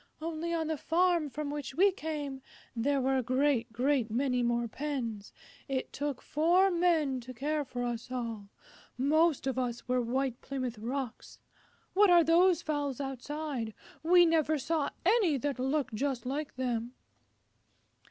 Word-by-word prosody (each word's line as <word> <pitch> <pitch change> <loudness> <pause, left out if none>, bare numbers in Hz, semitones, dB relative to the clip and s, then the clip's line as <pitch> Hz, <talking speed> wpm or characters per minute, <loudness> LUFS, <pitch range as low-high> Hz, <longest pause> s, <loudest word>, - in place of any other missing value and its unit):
"Only 330 +1 -3
on 330 -1 0
the 315 0 -2
farm 340 -2 +2
from 290 +1 -4
which 290 -2 -5
we 390 +3 +5
came 295 -6 -5 0.3
there 275 +4 +1
were 265 +1 +1
a - - +1
great, 255 -1 +1
great 250 0 +1
many 250 +2 +1
more 240 0 +1
pens. 235 -6 -4 0.4
It 270 -2 -3
took 285 -2 -3
four 350 +6 +3
Men 330 -7 +2
to 250 +1 -10
care 295 +4 -1
for 245 -2 -5
us 240 0 -4
all. 230 -5 -4 0.5
Most 310 +3 +2
of 260 -1 -1
us 245 -2 -3
were 250 0 +2
White 255 +1 -1
Plymouth 255 -5 -4
Rocks. 250 +1 -5 0.6
What 410 +1 +5
are 345 -1 +7
those 340 +1 +4
fowls 290 -4 -2
outside? 270 -3 -4 0.3
We 350 +2 +6
never 315 -2 +2
saw 310 +1 -1 0.2
any 380 -7 +4
that 280 0 -2
looked 265 -1 0
just 255 +1 -2
like 285 +3 -3
them." 245 -1 -2
275 Hz, 150 wpm, -31 LUFS, 250-315 Hz, 0.6 s, are